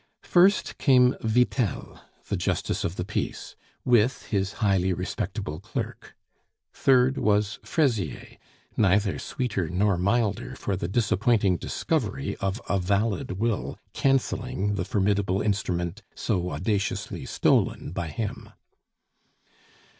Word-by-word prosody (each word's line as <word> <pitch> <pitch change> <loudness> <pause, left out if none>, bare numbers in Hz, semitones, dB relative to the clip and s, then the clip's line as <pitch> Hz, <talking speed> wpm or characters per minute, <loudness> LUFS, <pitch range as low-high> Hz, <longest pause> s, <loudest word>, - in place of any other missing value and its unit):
First 185 +3 +3
came 125 -2 +5
Vitel, 120 - 0 0.3
the - - -1
justice - - -1
of 85 - -2
the 90 - -3
peace, 105 - -4 0.3
with 120 +1 +3
his 100 -1 0
highly 95 -4 +1
respectable 90 -1 -4
clerk; - - -6 0.6
third 130 0 +3
was 105 0 +1
Fraisier, 115 - -1 0.4
neither 100 -1 +2
sweeter 100 -10 -2
nor 95 +1 +1
milder 105 +2 0
for 100 - -2
the 90 - -3
disappointing 105 -2 +2
discovery - - -2
of 95 +3 -2
a 100 - +1
valid 100 +5 0
will 95 - -2 0.2
canceling 130 -5 0
the 95 -3 -2
formidable 100 -1 +1
instrument 100 -2 -1
so 90 -5 -1
audaciously 100 +2 -2
stolen - - +1
by 85 -2 -3
him. 100 +7 -5
100 Hz, 110 wpm, -26 LUFS, 95-115 Hz, 0.6 s, came